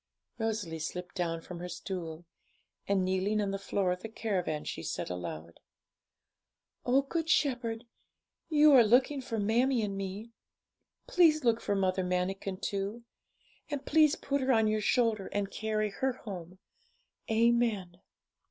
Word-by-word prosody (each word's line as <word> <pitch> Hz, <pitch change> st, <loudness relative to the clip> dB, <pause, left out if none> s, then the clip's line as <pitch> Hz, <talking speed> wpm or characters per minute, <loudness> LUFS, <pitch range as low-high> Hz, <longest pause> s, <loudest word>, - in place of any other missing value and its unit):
Rosalie 210 Hz, -8 st, -2 dB
slipped 180 Hz, +3 st, -5 dB
down 165 Hz, -3 st, -2 dB
from 175 Hz, +1 st, -8 dB
her 180 Hz, +1 st, -6 dB
stool, 175 Hz, -2 st, -6 dB, 0.6 s
and, 195 Hz, -2 st, +2 dB
kneeling 190 Hz, +3 st, +1 dB
on 200 Hz, -1 st, 0 dB
the 195 Hz, -, -3 dB
floor 195 Hz, -1 st, 0 dB
of 180 Hz, 0 st, -3 dB
the 225 Hz, -, -6 dB
caravan, 185 Hz, -9 st, -2 dB
she -, -, -5 dB
said -, -, -4 dB
aloud 85 Hz, -2 st, -6 dB, 1.3 s
'O 265 Hz, +3 st, +4 dB
Good 325 Hz, +3 st, -3 dB
Shepherd, 245 Hz, -6 st, +1 dB, 0.6 s
you 305 Hz, -1 st, +6 dB
are 255 Hz, -3 st, +9 dB
looking 255 Hz, +5 st, +3 dB
for 230 Hz, -3 st, -4 dB
mammie 230 Hz, +4 st, +2 dB
and 200 Hz, -1 st, -2 dB
me; 195 Hz, +4 st, -5 dB, 0.7 s
please 335 Hz, -, +4 dB
look 230 Hz, -2 st, +2 dB
for 205 Hz, -, 0 dB
Mother 190 Hz, -1 st, +1 dB
Manikin 185 Hz, +1 st, -2 dB
too; 200 Hz, +4 st, -3 dB, 0.7 s
and 285 Hz, -2 st, -4 dB
please 305 Hz, -1 st, +4 dB
put 280 Hz, 0 st, -2 dB
her 265 Hz, 0 st, +2 dB
on 225 Hz, -3 st, +4 dB
your 215 Hz, 0 st, +1 dB
shoulder 225 Hz, -3 st, +1 dB
and 200 Hz, -1 st, -2 dB
carry 215 Hz, 0 st, -1 dB
her 265 Hz, +5 st, -1 dB
home. 185 Hz, -7 st, -8 dB, 0.7 s
Amen.' 220 Hz, -5 st, +1 dB
210 Hz, 145 wpm, -31 LUFS, 185-245 Hz, 1.3 s, are